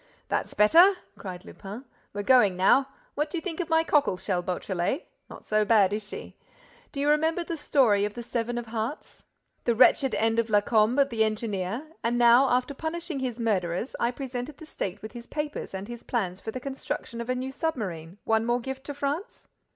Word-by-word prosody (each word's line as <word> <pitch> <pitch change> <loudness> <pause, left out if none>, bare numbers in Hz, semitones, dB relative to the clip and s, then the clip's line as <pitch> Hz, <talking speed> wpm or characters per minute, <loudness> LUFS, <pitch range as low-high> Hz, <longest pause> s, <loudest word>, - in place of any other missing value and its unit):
"That's - - -2
better," 335 - +7 0.2
cried 185 0 -8
Lupin. 210 +7 -9 0.3
"We're 205 0 -4
going 210 -7 +5
now. 260 +9 +4 0.3
What 300 +1 -1
do 350 - -3
you - - -3
think 350 -3 -4
of 350 -2 -2
my 325 0 +4
cockle 290 - +2
shell, 185 -1 -1
Beautrelet? 180 - -2 0.2
Not - - -11
so 215 0 +2
bad, 205 -3 +4
is 215 - -1
she? - - -8 0.6
Do 280 - -6
you 285 - +1
remember 320 +3 +2
the 335 - -4
story 255 -9 +3
of 210 0 -2
the 240 - -6
Seven 240 0 -2
of 240 - -3
Hearts, 225 +5 -5 0.4
the 235 - +2
wretched 265 +3 +5
end 225 +1 +2
of 230 0 0
Lacombe, 215 +5 +4
the 230 -5 +1
engineer, 215 +2 -2 0.2
and 240 +1 +1
how, 240 +3 +6
after 255 +3 +1
punishing 320 +1 -4
his 250 -2 -3
murderers, 195 -1 -1
I 235 - +2
presented 255 +2 -5
the 320 - -11
State 195 - -5
with 215 - -7
his 240 -1 -10
papers 300 -1 -4
and 190 +1 -6
his 240 0 -8
plans 190 -6 -2
for - - -6
the 255 - -4
construction 265 -3 -5
of 235 - -7
a 255 - +1
new 260 +1 -3
submarine: 200 - -4
one 225 0 +2
more 240 +1 +1
gift 265 +2 -6
to 290 - -5
France? 285 - -4
240 Hz, 200 wpm, -27 LUFS, 210-280 Hz, 0.6 s, better